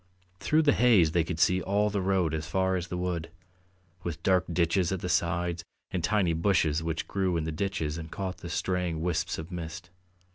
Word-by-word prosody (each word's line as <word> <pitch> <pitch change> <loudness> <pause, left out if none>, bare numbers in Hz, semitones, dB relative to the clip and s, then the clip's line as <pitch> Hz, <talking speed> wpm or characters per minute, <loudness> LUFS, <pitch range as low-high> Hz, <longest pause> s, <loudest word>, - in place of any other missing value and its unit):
Through 155 +1 +2
the 145 -2 +4
haze 105 -10 +5
they 85 0 +2
could 80 0 -4
see 90 +3 +3
all 105 +2 +1
the 100 -1 -1
road 95 -4 +1
as 80 0 -3
far 95 +3 +1
as 90 -1 -3
the 90 +1 -4
wood, 90 -2 -2 0.7
with 85 -2 -5
dark 95 -1 +3
ditches 85 +1 +1
at 95 -2 -2
the - - -3
sides 85 0 0 0.3
and 90 -3 -2
tiny 95 -1 +2
bushes 80 -3 +2
which 80 -1 -3
grew 95 -3 0
in 80 - -1
the 80 - -3
ditches 80 -2 -2
and 80 0 -7
caught 95 +1 -4
the 85 - -7
straying 90 -2 -1
wisps 85 0 -1
of 80 +3 -7
mist. 85 0 -7
90 Hz, 205 wpm, -28 LUFS, 80-95 Hz, 0.7 s, haze